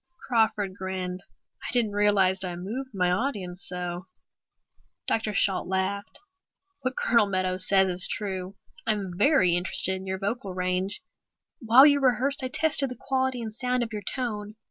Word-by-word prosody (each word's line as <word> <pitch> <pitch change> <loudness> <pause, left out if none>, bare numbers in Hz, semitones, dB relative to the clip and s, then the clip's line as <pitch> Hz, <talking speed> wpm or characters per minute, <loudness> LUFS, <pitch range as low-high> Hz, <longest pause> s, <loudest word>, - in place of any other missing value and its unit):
Crawford 220 -5 +1
grinned. 185 -1 -5 0.4
"I - - -6
didn't 235 -4 +1
realize 200 -2 +2
I 180 -2 -4
moved 225 +10 -6
my 180 -3 0
audience 190 -4 -2
so." 180 0 -5 1.0
Dr. 220 -1 -1
Shalt 195 -1 +1
laughed. 190 +2 -3 0.6
"What 255 0 -4
Colonel 230 -3 +3
Meadows 185 -1 -2
says 190 -1 +4
is 180 0 +4
true. 190 -2 -5 0.3
I'm 200 -5 -2
very 200 - +3
interested 185 +1 +5
in 190 0 -10
your 190 0 -3
vocal 200 -1 -4
range. 185 +2 -2 0.6
While 240 +3 +6
you 285 -1 +5
rehearsed 270 +1 +1
I 260 - -2
tested 285 0 +4
the 250 - -8
quality 260 -2 -1
and 220 -1 -6
sound 250 +1 -1
of 225 -1 -7
your 210 - -4
tone." 210 -2 -4
200 Hz, 155 wpm, -26 LUFS, 185-240 Hz, 1.0 s, While